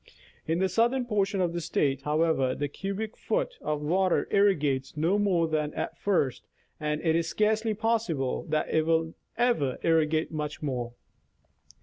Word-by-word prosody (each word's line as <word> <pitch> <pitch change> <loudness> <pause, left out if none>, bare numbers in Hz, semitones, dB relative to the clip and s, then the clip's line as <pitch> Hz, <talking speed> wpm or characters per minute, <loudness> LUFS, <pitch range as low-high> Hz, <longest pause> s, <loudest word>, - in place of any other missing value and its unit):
In 165 +1 +1
the 190 +2 +2
southern 240 +6 +1
portion 200 -3 0
of 175 -2 0
the 170 - -2
State, 140 -3 0
how 150 +3 +1
ever, 135 -6 +1
the 145 - -2
cubic 200 +8 -5
foot - - -2
of 150 -1 -2
water 185 +4 +2
irrigates 150 -9 +2
no 170 +7 +2
more 180 -5 +2
than 155 -1 -1
at 165 - -3
first, 170 -9 0 0.4
and 150 0 -1
it 160 -2 +2
is 165 0 +1
scarcely 215 +3 +1
possible 210 - -1
that 155 0 0
it 160 0 +2
will 165 0 +1 0.2
ever 230 - +1
irrigate 160 -1 +2
much 150 -1 -4
more. 125 -4 -3
165 Hz, 160 wpm, -28 LUFS, 150-200 Hz, 0.4 s, the